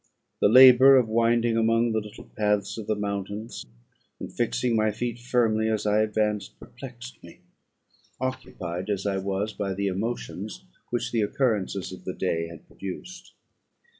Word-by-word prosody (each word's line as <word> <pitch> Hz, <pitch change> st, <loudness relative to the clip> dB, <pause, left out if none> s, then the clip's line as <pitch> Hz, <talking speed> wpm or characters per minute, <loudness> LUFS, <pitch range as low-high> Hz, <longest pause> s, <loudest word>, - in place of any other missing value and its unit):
The -, -, +4 dB
labour 130 Hz, +2 st, +9 dB
of 125 Hz, -3 st, +3 dB
winding 115 Hz, +1 st, +2 dB
among 115 Hz, +1 st, +2 dB
the 110 Hz, -, +1 dB
little 105 Hz, -1 st, -10 dB
paths 105 Hz, -2 st, 0 dB
of 110 Hz, -, -7 dB
the 110 Hz, -, +1 dB
mountains, 100 Hz, +2 st, -5 dB, 0.5 s
and -, -, -8 dB
fixing 115 Hz, -, 0 dB
my 110 Hz, 0 st, +2 dB
feet 120 Hz, +2 st, -4 dB
firmly 115 Hz, -3 st, +1 dB
as 110 Hz, -1 st, -1 dB
I 105 Hz, +1 st, +3 dB
advanced, 105 Hz, -1 st, -1 dB
perplexed 125 Hz, -1 st, -11 dB
me, 85 Hz, +1 st, -14 dB, 0.8 s
occupied 105 Hz, -8 st, -5 dB
as 100 Hz, -1 st, -2 dB
I 100 Hz, -1 st, 0 dB
was 100 Hz, +2 st, -2 dB
by 100 Hz, -2 st, -3 dB
the 100 Hz, +1 st, -2 dB
emotions 110 Hz, -, -4 dB, 0.2 s
which 120 Hz, -1 st, -2 dB
the 115 Hz, -, +1 dB
occurrences 105 Hz, -4 st, -1 dB
of 95 Hz, -, -10 dB
the 95 Hz, -, -4 dB
day 85 Hz, -3 st, -1 dB
had 85 Hz, -1 st, -12 dB
produced. 180 Hz, -, -9 dB
110 Hz, 155 wpm, -26 LUFS, 100-120 Hz, 0.8 s, labour